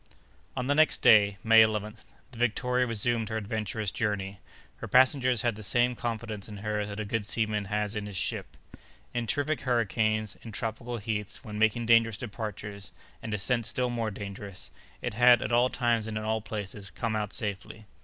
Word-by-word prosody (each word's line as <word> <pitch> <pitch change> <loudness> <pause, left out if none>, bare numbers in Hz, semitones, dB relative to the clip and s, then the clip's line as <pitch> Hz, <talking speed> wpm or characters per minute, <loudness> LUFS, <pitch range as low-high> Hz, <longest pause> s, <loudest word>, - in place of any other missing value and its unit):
On 125 - -1
the 140 - +2
next 155 +2 +3
day, 100 -3 +6
May 115 0 +7
11th, 110 0 0 0.3
the 120 - -11
Victoria 125 +2 +1
resumed 115 0 0
her 110 - -2
adventurous 110 -1 -3
journey. 100 -3 -2 0.4
Her - - -7
passengers 130 -2 +4
had 120 -3 +1
the 110 - -9
same 120 +5 +2
confidence 115 -3 -4
in 105 - -8
her 105 -1 -1
that 100 0 -6
a 110 - -2
good 110 +1 -1
seaman 105 -1 0
has 105 +1 -1
in 105 -1 -3
his 100 -2 -6
ship. - - -4 0.6
In 120 -1 -2
terrific 145 +5 -1
hurricanes, 110 -3 0
in 115 - -9
tropical 115 +3 -4
heats, 105 +2 -3
when 105 -3 -6
making 110 +2 +2
dangerous 115 -2 +4
departures, 105 -3 -6 0.3
and 110 - -6
descents 110 +2 0
still 125 +3 -1
more 115 -2 -1
dangerous, 100 -1 -7 0.3
it - - -2
had, 120 +1 +6
at - - -3
all 120 +2 +4
times 120 -3 0
and 110 -1 -4
in 110 - -3
all 110 0 0
places, 105 -2 -6
come 115 -2 -3
out 105 -1 -2
safely. 105 +1 -5
110 Hz, 185 wpm, -28 LUFS, 105-120 Hz, 0.6 s, May